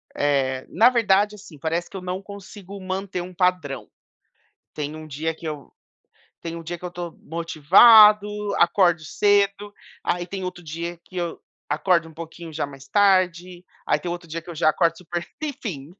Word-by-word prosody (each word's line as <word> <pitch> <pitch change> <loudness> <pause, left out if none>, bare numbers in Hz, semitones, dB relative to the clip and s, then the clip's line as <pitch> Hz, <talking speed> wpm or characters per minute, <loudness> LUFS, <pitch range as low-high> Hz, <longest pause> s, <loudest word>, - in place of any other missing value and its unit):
eh, 135 -2 0
na 235 +3 +5
verdade, 210 -3 +2
assim, 195 -7 -14
parece 165 +3 -2
que 195 - -8
eu - - -7
não 180 +1 -4
consigo 200 0 -10
manter 185 0 -4
um 180 +1 -8
padrão. 180 -7 -1 0.9
Tem 150 0 -4
um 155 0 -9
dia 155 +2 -3
que 165 - -10
eu 150 -4 -6 0.7
tem 165 0 -5
um 165 - -7
dia 170 +1 -6
que 180 - -14
eu - - -2
estou 175 -1 -7
motivado, 200 +7 +6 0.3
acordo 175 -2 +3
cedo, 205 +3 +1 0.3
aí 175 0 -1
tem 190 +1 -6
outro 180 -2 -6
dia 170 +2 -5
que 185 - -20
eu 175 -2 -3 0.3
acordo 165 +2 +1
um 160 - -16
pouquinho 165 0 -9
já 150 -1 -2
mais 140 0 -13
tarde, 185 -3 +2 0.2
aí - - +2
tem 175 - -4
outro 175 0 -6
dia 165 +1 -5
que 170 - -20
eu - - -7
já 155 0 +3
acordo 165 0 +1
super 175 -1 -5 0.2
enfim, 180 - -5
175 Hz, 180 wpm, -23 LUFS, 160-195 Hz, 0.9 s, motivado